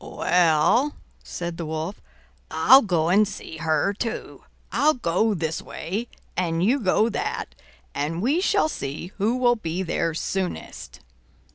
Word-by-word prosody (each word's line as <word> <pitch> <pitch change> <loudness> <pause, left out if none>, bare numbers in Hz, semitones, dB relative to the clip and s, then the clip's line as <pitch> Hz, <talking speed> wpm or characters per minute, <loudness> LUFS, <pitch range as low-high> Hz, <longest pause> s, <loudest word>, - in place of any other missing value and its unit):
"Well," 175 - +2 0.3
said 170 -1 -5
the 170 - -4
Wolf, 160 +5 -4 0.5
"I'll 255 +12 +7
go 170 - +1
and 205 +3 +4
see 190 -5 -8
her, 160 +4 +1
too. 225 +3 -5 0.3
I'll 310 +2 +3
go 215 0 +1
this 160 -2 -2
way 205 +9 -5 0.3
and 170 -1 0
you 250 +8 +3
go 215 0 +2
that, 430 - -3 0.4
and 150 +4 -2
we 275 - +1
shall 395 -3 +2
see 150 - -5
who 220 +5 +2
will 245 -1 +3
be 175 -2 -3
there 165 -2 -1
soonest." 185 +2 -4
185 Hz, 140 wpm, -24 LUFS, 165-240 Hz, 0.5 s, I'll